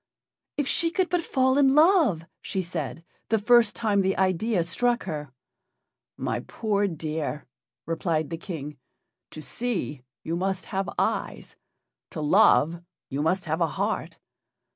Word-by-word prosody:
"If 290 Hz, -2 st, 0 dB
she 330 Hz, -, +2 dB
could 370 Hz, +1 st, 0 dB
but 355 Hz, -1 st, +2 dB
fall 260 Hz, -3 st, +2 dB
in 270 Hz, -1 st, +5 dB
love," 305 Hz, -, +4 dB, 0.2 s
she 190 Hz, -, -2 dB
said, 165 Hz, -2 st, -5 dB, 0.2 s
the 225 Hz, -, +3 dB
first 230 Hz, 0 st, +4 dB
time 210 Hz, -3 st, +2 dB
the 190 Hz, 0 st, 0 dB
idea 190 Hz, +1 st, +1 dB
struck 240 Hz, +8 st, 0 dB
her. 150 Hz, -6 st, -5 dB, 0.9 s
"My -, -, -2 dB
poor 205 Hz, -2 st, -1 dB
dear!" 155 Hz, -3 st, -4 dB, 0.4 s
replied 165 Hz, -1 st, -1 dB
the 165 Hz, -, -2 dB
King, 150 Hz, -4 st, -7 dB, 0.5 s
"to 155 Hz, -, -9 dB
see, 205 Hz, -, -3 dB, 0.2 s
you 165 Hz, -, -2 dB
must 190 Hz, +1 st, -2 dB
have 195 Hz, 0 st, -2 dB
eyes; -, -, -2 dB, 0.5 s
to 165 Hz, -, -7 dB
love, 155 Hz, +2 st, +4 dB, 0.3 s
you 140 Hz, +1 st, -2 dB
must 180 Hz, +5 st, +1 dB
have 160 Hz, +2 st, -2 dB
a 165 Hz, -, +4 dB
heart." -, -, -2 dB
185 Hz, 140 wpm, -26 LUFS, 160-235 Hz, 0.9 s, in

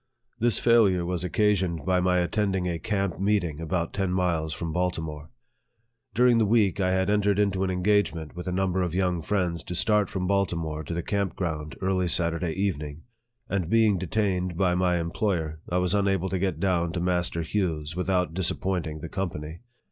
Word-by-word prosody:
This 120 Hz, -1 st, +3 dB
failure 105 Hz, -7 st, +4 dB
was 90 Hz, 0 st, -2 dB
occasioned 95 Hz, -4 st, +1 dB
by 95 Hz, -1 st, +2 dB
my 90 Hz, 0 st, +2 dB
attending 95 Hz, +1 st, 0 dB
a 85 Hz, -2 st, -2 dB
camp 100 Hz, -5 st, -2 dB
meeting 95 Hz, -6 st, 0 dB
about 85 Hz, +1 st, -2 dB
ten 95 Hz, -2 st, -1 dB
miles 85 Hz, -4 st, 0 dB
from 80 Hz, 0 st, -4 dB
Baltimore. 80 Hz, -4 st, -3 dB, 0.9 s
During 120 Hz, 0 st, +5 dB
the 110 Hz, -, +3 dB
week, 105 Hz, -4 st, +3 dB
I 95 Hz, -1 st, +2 dB
had 95 Hz, 0 st, +1 dB
entered 100 Hz, -1 st, +2 dB
into 100 Hz, -2 st, +1 dB
an 95 Hz, -, 0 dB
engagement 90 Hz, -4 st, 0 dB
with 90 Hz, +1 st, -7 dB
a -, -, -1 dB
number 95 Hz, 0 st, 0 dB
of 90 Hz, -1 st, -2 dB
young 90 Hz, -2 st, +1 dB
friends 90 Hz, -2 st, -1 dB
to 90 Hz, -, -4 dB
start 105 Hz, +1 st, +2 dB
from 95 Hz, -1 st, -3 dB
Baltimore 85 Hz, -5 st, -1 dB
to 85 Hz, -, -4 dB
the 85 Hz, -, -2 dB
camp 100 Hz, -2 st, -1 dB
ground 75 Hz, -5 st, -3 dB
early 95 Hz, -1 st, +1 dB
Saturday 85 Hz, 0 st, 0 dB
evening; 80 Hz, -6 st, -3 dB, 0.4 s
and 95 Hz, -6 st, -2 dB
being 110 Hz, -3 st, +3 dB
detained 95 Hz, -2 st, -1 dB
by 90 Hz, -2 st, +2 dB
my 90 Hz, -1 st, +2 dB
employer, 85 Hz, -2 st, -2 dB
I 90 Hz, -, 0 dB
was 90 Hz, +1 st, +1 dB
unable 95 Hz, -2 st, +1 dB
to 95 Hz, -, -1 dB
get 95 Hz, 0 st, -1 dB
down 85 Hz, -3 st, +1 dB
to 90 Hz, -, -2 dB
Master 90 Hz, -1 st, 0 dB
Hugh's 80 Hz, -4 st, -2 dB
without 90 Hz, -2 st, 0 dB
disappointing 85 Hz, -3 st, -1 dB
the 85 Hz, -, -5 dB
company. 80 Hz, -4 st, -4 dB
90 Hz, 180 wpm, -26 LUFS, 85-100 Hz, 0.9 s, During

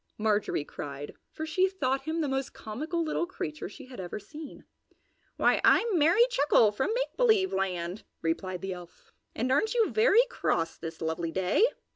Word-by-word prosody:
Marjorie 210 Hz, -8 st, 0 dB
cried, 145 Hz, 0 st, -7 dB, 0.2 s
for 315 Hz, -, -5 dB
she 370 Hz, +4 st, +2 dB
thought 270 Hz, -8 st, -1 dB
him 320 Hz, +1 st, -1 dB
the 300 Hz, -, 0 dB
most 270 Hz, 0 st, -2 dB
comical 310 Hz, +11 st, -3 dB
little 325 Hz, +2 st, -1 dB
creature 360 Hz, -5 st, -5 dB
she 280 Hz, -, -11 dB
had 255 Hz, -4 st, -11 dB
ever 180 Hz, -2 st, -5 dB
seen. 300 Hz, +9 st, -10 dB, 0.7 s
"Why, -, -, +3 dB
I'm 440 Hz, -7 st, +4 dB
Merry 340 Hz, +11 st, +5 dB
Chuckle 290 Hz, -, +4 dB
from 265 Hz, -, -1 dB
Make -, -, -2 dB
Believe 440 Hz, -6 st, +3 dB
Land!" 185 Hz, 0 st, -2 dB, 0.2 s
replied 180 Hz, +2 st, -2 dB
the 195 Hz, -1 st, -2 dB
elf. 175 Hz, -1 st, -13 dB, 0.2 s
"And 255 Hz, +3 st, -1 dB
aren't 435 Hz, -, +2 dB
you 455 Hz, -2 st, +3 dB
very 460 Hz, +1 st, +5 dB
cross 165 Hz, -, -1 dB
this 165 Hz, 0 st, -8 dB
lovely 160 Hz, +1 st, -2 dB
day?" 190 Hz, -, +3 dB
270 Hz, 170 wpm, -29 LUFS, -, 0.7 s, Merry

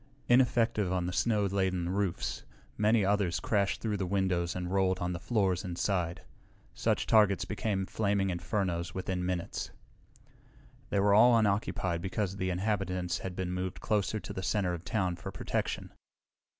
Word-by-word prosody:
Ineffective 120 Hz, -5 st, +3 dB
on 90 Hz, -1 st, 0 dB
the 90 Hz, -, -3 dB
snow 105 Hz, -1 st, +2 dB
laden 95 Hz, -3 st, 0 dB
roofs, 95 Hz, -1 st, -2 dB, 0.3 s
many 105 Hz, 0 st, +3 dB
others 100 Hz, -3 st, +1 dB
crashed 100 Hz, -3 st, 0 dB
through 105 Hz, -2 st, -1 dB
the 95 Hz, -2 st, -2 dB
windows 90 Hz, -2 st, 0 dB
and 90 Hz, 0 st, -3 dB
rolled 95 Hz, -1 st, +2 dB
on 90 Hz, 0 st, -2 dB
the 85 Hz, -, -4 dB
floors 95 Hz, -4 st, 0 dB
inside. 90 Hz, -1 st, -1 dB, 0.5 s
Such -, -, 0 dB
targets 105 Hz, -4 st, +4 dB
became 100 Hz, -2 st, -1 dB
flaming 100 Hz, -1 st, 0 dB
infernos 85 Hz, -1 st, -2 dB
within 95 Hz, -1 st, -2 dB
minutes. 90 Hz, -1 st, -3 dB, 1.2 s
They 100 Hz, -, +1 dB
were 100 Hz, +1 st, +4 dB
all 115 Hz, +3 st, +7 dB
unoccupied 100 Hz, -5 st, 0 dB
because 95 Hz, +1 st, -2 dB
the 95 Hz, -1 st, -1 dB
inhabitants 90 Hz, -2 st, -1 dB
had 95 Hz, -1 st, -5 dB
been 90 Hz, -1 st, -3 dB
moved 90 Hz, 0 st, -3 dB
closer 105 Hz, 0 st, 0 dB
to 95 Hz, +1 st, -7 dB
the 95 Hz, -, -4 dB
center 95 Hz, -2 st, 0 dB
of 85 Hz, -1 st, -6 dB
town 90 Hz, -1 st, -1 dB
for -, -, -7 dB
protection. -, -, -3 dB
95 Hz, 155 wpm, -31 LUFS, 90-105 Hz, 1.2 s, all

